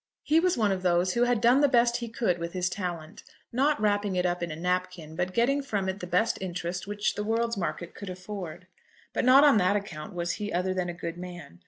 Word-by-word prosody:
He 315 +2 +4
was 360 -2 +2
one 215 -3 +2
of 190 -1 -1
those 180 0 +2
who 240 +1 +3
had 245 -2 +2
done 240 +5 +5
the 290 - +6
best 240 -1 +3
he 235 -1 -5
could 220 -6 0
with 170 0 -5
his 180 0 -1
talent, 175 -5 -5 0.3
not 280 +3 +2
wrapping 205 -2 +1
it 180 0 +1
up 175 0 0
in 170 - -2
a 155 - -5
napkin, 180 -2 -2
but 180 +2 -1
getting 255 +7 +2
from 205 -8 -2
it 190 +1 -3
the 180 - -6
best 180 +6 +1
interest 180 0 -4
which 205 0 -1
the 210 - -3
world's 230 +2 0
market 170 -2 -4
could 200 - -8
afford. 185 -2 -7 0.5
But - - 0
not 265 +3 +8
on 285 -6 +6
that 185 +1 +3
account 180 -3 -5
was 175 0 -1
he 210 -1 -4
other 180 +2 0
than 180 -1 -2
a - - -3
good 170 0 -6
man. 175 - -9
185 Hz, 240 wpm, -28 LUFS, 175-230 Hz, 0.5 s, not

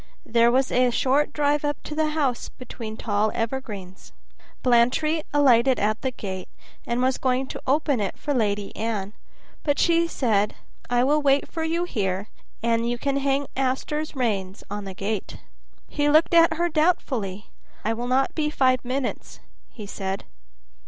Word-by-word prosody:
There 235 +1 +4
was 260 +1 +2
a 250 0 +4
short 270 +4 +2
drive 295 0 +1
up 290 -1 0
to - - -6
the 310 0 +1
house 285 -6 -1
between 225 -3 -8
tall 210 0 0
evergreens. 220 -6 -5 0.5
Blantyre 255 +6 +3
alighted 265 -3 +4
at 215 +1 0
the 260 - 0
gate, 190 -6 -6 0.4
and 240 +1 0
was 260 0 +1
going 260 0 +1
to - - -6
open 285 -1 +2
it 200 -3 -2
for 290 - -2
Lady 205 -5 -1
Anne, 215 -3 -3 0.5
but 290 -2 0
she 335 0 +3
said, 215 -9 +1 0.3
"I 245 0 +3
will 295 +3 +3
wait 280 -1 +3
for 325 - -3
you 335 +2 0
here, 200 - -2 0.3
and 230 0 +1
you 240 - -1
can 275 +2 -1
hang 275 0 +1
Auster's 270 +4 -1
rein 200 -7 -1 0.2
on 205 -1 -4
the 190 -1 -7
gate." 200 +1 -3 0.5
He 290 -1 0
looked 310 +3 +4
at 335 -1 +6
her 340 +2 +1
doubtfully. 260 - 0 0.3
"I 225 - +2
will 240 +2 -4
not 265 +2 +2
be 300 -2 0
five 255 -4 +2
minutes," 255 +1 -4 0.3
he 215 -4 -9
said. 195 -1 -4
255 Hz, 165 wpm, -24 LUFS, 215-290 Hz, 0.5 s, at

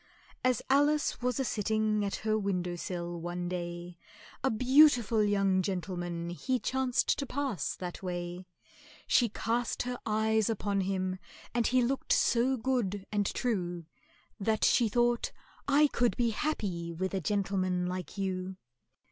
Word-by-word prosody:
As 255 -3 +2
ALICE 290 +2 +2
was 250 +1 0
a 265 - +1
sitting 215 -1 0
at 200 - -1
her 215 0 +2
window 180 -4 -1
sill 175 -1 -4
one 175 +1 -3
day, 175 -1 -5 0.4
A 265 - +3
beautiful 245 -3 +5
young 195 -2 +2
gentleman 175 -2 -3
he 255 +9 -1
chanced 260 0 0
to 280 - -2
pass 270 -7 -2
that 180 -1 -6
way; 175 0 -5 0.6
She 240 -3 +3
cast 235 +3 -1
her 245 0 -4
eyes 220 0 +1
upon 205 -2 0
him, 185 -1 -2 0.3
and 235 -1 +2
he 255 0 +3
looked 265 +3 0
so 250 +3 +3
good 220 -6 -1
and 205 -2 +1
true, 175 -8 -2 0.5
That 220 +2 +1
she 235 -3 +4
thought, 240 +1 +1 0.4
"I 290 +2 +5
could 245 -4 +1
be 235 -2 +2
happy 200 - -2
with 185 +3 -3
a 190 - -1
gentleman 185 -1 0
like 180 +2 -5
you!" 190 -1 -3
205 Hz, 145 wpm, -30 LUFS, 180-245 Hz, 0.6 s, beautiful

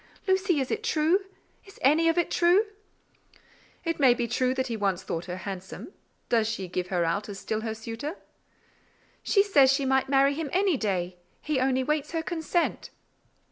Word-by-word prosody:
Lucy, 380 -4 +2
is 265 - -2
it - - -2
true? 335 +6 +2 0.4
Is 390 0 -16
any 315 +5 +4
of 330 - 0
it 345 - +1
true?" 355 +5 +4 1.2
"It 330 -1 -2
may 260 -4 +5
be 240 -1 -2
true 255 +2 0
that 260 0 0
he 235 -3 -3
once 195 -4 -1
thought 165 +1 -4
her 180 0 -5
handsome: 190 - -7 0.3
does 225 -2 +2
she 210 -4 -3
give 180 0 -3
him 180 -2 0
out 200 +6 -1
as 200 - -6
still 215 +2 -3
her 220 -1 -4
suitor?" 230 - -6 1.1
"She 400 -2 +3
says 285 -10 +5
she 275 0 +1
might 265 0 +1
marry 275 0 +4
him 305 0 -4
any 380 -2 +3
day: 185 -6 -2 0.2
he 305 -3 -1
only 260 0 +1
waits 300 +3 -2
her 325 -1 -1
consent." 340 0 -1
265 Hz, 180 wpm, -27 LUFS, 215-325 Hz, 1.2 s, may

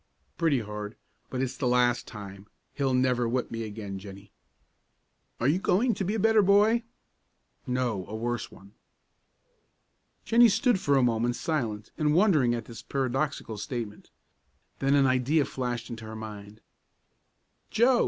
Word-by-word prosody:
"Pretty 155 -7 +2
hard, 105 0 -6 0.3
but 130 0 -2
it's 135 0 -3
the 130 - -1
last 125 0 +2
time. 100 -2 -9 0.3
He'll 135 -2 0
never 125 -2 +2
whip 125 +1 -1
me 115 0 -4
again, 105 -3 -6
Jennie." 100 0 -11 1.1
"Are 120 - +1
you 160 +6 +3
going 225 +6 +2
to 195 - -3
be 200 +4 -1
a - - -1
better 220 +1 +5
boy?" 205 +4 +4 0.9
"No, 125 -7 -1
a 105 - -6
worse 120 +1 -3
one." 100 +1 -15 1.5
Jennie 235 +1 +6
stood 240 0 +2
for 145 -5 +2
a 130 - +4
moment 120 0 +1
silent 115 -8 -2
and 150 -1 +2
wondering 155 - +4
at 115 -2 -5
this 115 -1 -10
paradoxical 130 -3 -2
statement. 105 -1 -5 0.7
Then 135 +1 +3
an 140 -1 +5
idea 130 +4 +2
flashed 125 -2 -4
into 115 -1 -7
her 110 0 -7
mind. 105 -1 -9 1.1
"Joe!" 240 +3 +4
125 Hz, 150 wpm, -28 LUFS, 110-150 Hz, 1.5 s, Jennie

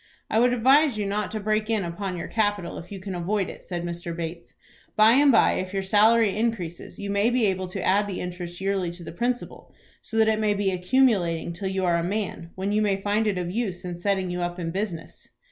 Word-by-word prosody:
"I 220 - +3
would 245 +1 +4
advise 265 +2 +4
you 210 - -1
not 205 +1 -1
to 215 - -4
break 215 +1 0
in 220 -3 +1
upon 180 +2 -4
your 170 - -5
capital 205 -5 -1
if 175 - -12
you 195 - -6
can 190 0 -6
avoid 185 +3 -1
it," - - -13
said 175 -2 -4
Mr. 170 0 -5
Bates. 170 0 -6 0.4
"By 215 +1 +6
and 280 +3 +6
by, - - +5
if 185 +1 -5
your 195 - 0
salary 215 +2 +4
increases, 210 -7 -3
you 200 0 -4
may 200 +3 +2
be 245 -2 +2
able 190 -2 0
to 185 0 -5
add 205 +2 +2
the 190 -3 -4
interest 175 -1 -6
yearly 190 -2 -1
to 175 0 -10
the - - -7
principal, 240 +7 -3 0.3
so 225 - -5
that 220 0 +5
it 220 -1 +2
may 210 -1 +2
be 200 -1 0
accumulating 180 -4 +1
till 190 +3 -4
you 190 -1 -1
are 170 -1 +3
a 170 - -1
man, 190 -3 -3
when 190 +2 -2
you 210 +1 +2
may 200 -2 +1
find 210 +2 0
it 200 -3 0
of 175 -1 -3
use 195 -5 -3
in 180 - -4
setting 190 0 -1
you 180 0 -3
up 175 0 -3
in 165 -2 -3
business." 185 -3 -5
195 Hz, 240 wpm, -25 LUFS, 180-215 Hz, 0.4 s, By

